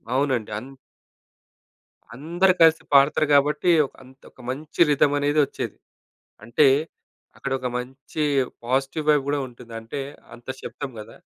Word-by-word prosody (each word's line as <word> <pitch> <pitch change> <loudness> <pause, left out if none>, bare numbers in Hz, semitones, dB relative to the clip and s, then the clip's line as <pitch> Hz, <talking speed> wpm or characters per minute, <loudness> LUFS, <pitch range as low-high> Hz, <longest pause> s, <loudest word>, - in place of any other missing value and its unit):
అవునండి. 130 -6 0
అన్ 130 +5 -11 1.4
అందరూ 175 +7 +2
కలిసి 160 0 +5
పాడుతరు 140 +2 +5
కాబట్టి 145 +5 +3 0.2
ఒక - - -13
అంత్ 130 +1 -18 0.2
మంచి 145 +6 -4
రిథమ్ 145 0 +3
అనేదొచ్చేది. 145 0 0 0.7
అంటే 120 +6 +3 0.7
అక్కడ 140 - -5
ఒక 130 - -3
మంచి 135 +5 -5 0.4
పాజిటివ్ 135 +5 -1
వైబ్ 150 -2 +4
గూడా 145 0 0
ఉంటుంది. 120 -1 -14
అంటే 115 +5 -7 0.3
అంత 120 0 -15
శబ్దం 145 - -6
కదా! 105 - -11
140 Hz, 120 wpm, -23 LUFS, 130-150 Hz, 1.4 s, కలిసి